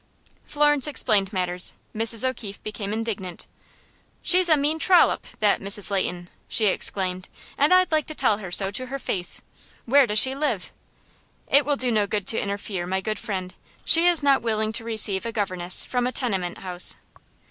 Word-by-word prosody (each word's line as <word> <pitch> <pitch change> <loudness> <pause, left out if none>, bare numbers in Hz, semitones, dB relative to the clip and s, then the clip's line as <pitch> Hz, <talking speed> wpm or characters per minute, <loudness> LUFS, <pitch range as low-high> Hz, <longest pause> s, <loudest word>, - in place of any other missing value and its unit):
Florence 295 -1 +2
explained 210 -9 0
matters. 180 -2 -2 0.2
Mrs. 225 +2 +2
O'Keefe 215 -6 -7
became 205 -1 -6
indignant. 210 -5 -5 0.8
"She's 365 -1 +4
a 310 - +5
mean 300 +3 -1
trollop, 360 +1 +4
that 210 -1 +2
Mrs. 200 +1 -1
Leighton!" 180 -2 -3 0.2
she 220 - +1
exclaimed, 185 -1 -2 0.3
"and 290 +4 +1
I'd 370 -1 +4
like 310 -2 0
to 310 - -8
tell 205 - +1
her 190 -4 -8
so 195 +2 +3
to 255 +5 -4
her 275 +2 -5
face. 185 -8 -1 0.4
Where 275 +2 +4
does 210 - -1
she 260 +4 +7
live?" 270 -10 -3 0.7
"It 280 0 +3
will 290 - +1
do 250 -2 0
no 210 -2 +1
good 205 -1 -3
to 225 - +1
interfere, 200 -3 -5
my 190 +1 -1
good 215 +1 -4
friend. 185 -3 -5 0.3
She 335 +2 +6
is 345 -4 +3
not 275 -1 +3
willing 220 -1 -2
to 230 +1 -2
receive 215 -4 0
a 230 - -4
governess 185 -4 -1
from 245 -1 -1
a - - -2
tenement 195 -9 -1
house." 180 -1 +2
215 Hz, 180 wpm, -23 LUFS, 195-270 Hz, 0.8 s, she